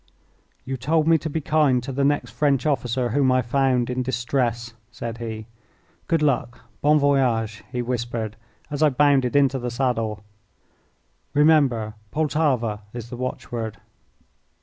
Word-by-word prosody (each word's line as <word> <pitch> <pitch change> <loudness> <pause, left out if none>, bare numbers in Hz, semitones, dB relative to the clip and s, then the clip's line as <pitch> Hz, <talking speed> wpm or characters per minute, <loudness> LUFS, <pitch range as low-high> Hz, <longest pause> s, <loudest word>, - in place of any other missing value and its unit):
"You 135 0 -3
told 155 +5 +1
me 165 -1 +5
to 160 - -4
be 160 +2 -2
kind 145 -5 +2
to 135 - -5
the 140 +2 -1
next 145 +1 +1
French 140 -3 +1
officer 125 -4 0
whom 130 +2 +2
I 130 0 +3
found 125 0 +1
in 125 0 -2
distress," 120 -1 -1 0.2
said 115 0 -6
he. 110 -2 -5 0.6
"Good 165 -2 +1
luck! 125 -4 0 0.2
Bon 150 +1 +4
voyage!" 125 -6 +1
he 125 -2 -2
whispered, 120 -3 -3 0.4
as 145 0 -3
I 155 - +6
bounded 140 -2 +3
into 140 -1 +3
the 125 0 -3
saddle. 115 -4 -1 1.1
"Remember, 140 -8 +3 0.2
'Poltava' 140 -8 0
is 120 -1 -7
the - - -4
watchword." 120 -3 -4
130 Hz, 145 wpm, -23 LUFS, 120-145 Hz, 1.1 s, I